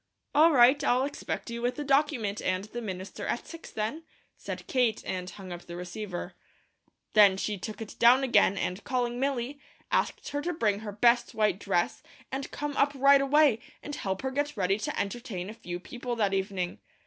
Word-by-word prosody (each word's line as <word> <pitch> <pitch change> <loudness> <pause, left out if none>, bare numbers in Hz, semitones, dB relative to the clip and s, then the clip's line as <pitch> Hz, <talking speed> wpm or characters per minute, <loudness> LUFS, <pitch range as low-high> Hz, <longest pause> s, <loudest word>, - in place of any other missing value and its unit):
"All 315 +3 +6
right, 265 +1 +6
I'll 255 -1 +3
expect 285 -4 -5
you 235 0 -4
with 245 +1 0
the 295 - -4
document 270 -7 +1
and 185 +1 0
the 235 +3 -6
minister 190 -3 -6
at - - -2
six, 330 0 -10
then," 220 +9 -3 0.3
said - - -7
Kate, 245 -4 +1
and 185 -1 -3
hung 190 -2 -10
up 175 0 -6
the 170 - -7
receiver. 180 +1 -6 0.8
Then 205 -3 +7
she 210 +2 -1
took 215 +4 -6
it 215 - -12
down 245 +3 +6
again 205 -6 +4
and 185 +1 -2
calling 245 -2 -1
Milly, 275 0 -1 0.3
asked - - 0
her 290 - -2
to 350 +3 -2
bring 210 -8 +1
her 215 -1 -6
best 235 +3 +3
white 210 -3 +2
dress, 185 -4 0 0.3
and 270 +1 -4
come 295 -1 -4
up 285 +1 +3
right 275 +1 +6
away, 275 -4 +4 0.2
and 290 - -6
help 190 -5 -3
her 265 - -1
get 290 0 -2
ready 195 +1 +1
to - - -3
entertain 200 -2 -4
a - - -9
few 180 -6 -6
people 245 +5 -5
that 205 -4 +1
evening. 190 -2 -2
235 Hz, 195 wpm, -29 LUFS, 195-270 Hz, 0.8 s, Then